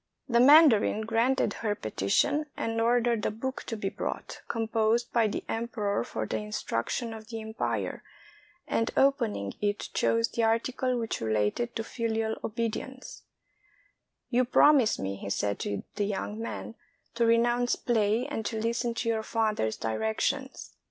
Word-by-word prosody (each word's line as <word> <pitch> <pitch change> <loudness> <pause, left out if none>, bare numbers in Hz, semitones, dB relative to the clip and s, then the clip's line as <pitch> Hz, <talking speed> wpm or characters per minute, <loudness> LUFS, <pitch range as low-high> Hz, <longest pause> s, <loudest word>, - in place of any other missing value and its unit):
The 235 -2 +3
mandarin 265 -6 +6
granted 225 +1 +1
her 210 -2 0
petition, 200 - 0
and 225 0 -1
ordered 235 -1 +2
a - - +1
book 260 +5 -4
to 225 - -3
be 195 -2 -2
brought, - - -5
composed 225 +1 0
by 230 -2 +4
the 205 - -3
emperor 220 - -1
for 110 -2 -4
the 110 - -2
instruction 115 - -3
of 220 -1 -10
the 225 -1 -5
empire, 220 +1 -3 0.7
and 225 +1 0
opening 235 - +2
it 205 0 -1
chose 230 0 +2
the 235 - -2
article 245 +3 +1
which 225 -1 -3
related 110 - 0
to 225 - -2
filial 225 -1 -2
obedience, 230 +4 -4 1.1
"You 250 +1 +4
promise 260 -1 +5
me," 95 0 -3
he 100 - -6
said 100 0 -1
to 100 -1 -3
the 205 - 0
young 205 +1 -3
man, 230 0 -5 0.4
*'to 235 - 0
renounce 240 +1 +3
play 225 0 +1
and 285 -6 -4
to 220 - -3
listen 235 +1 -1
to 230 - -2
your 225 -1 +1
father's 215 - 0
directions. 110 -1 -2
225 Hz, 150 wpm, -28 LUFS, 205-240 Hz, 1.1 s, mandarin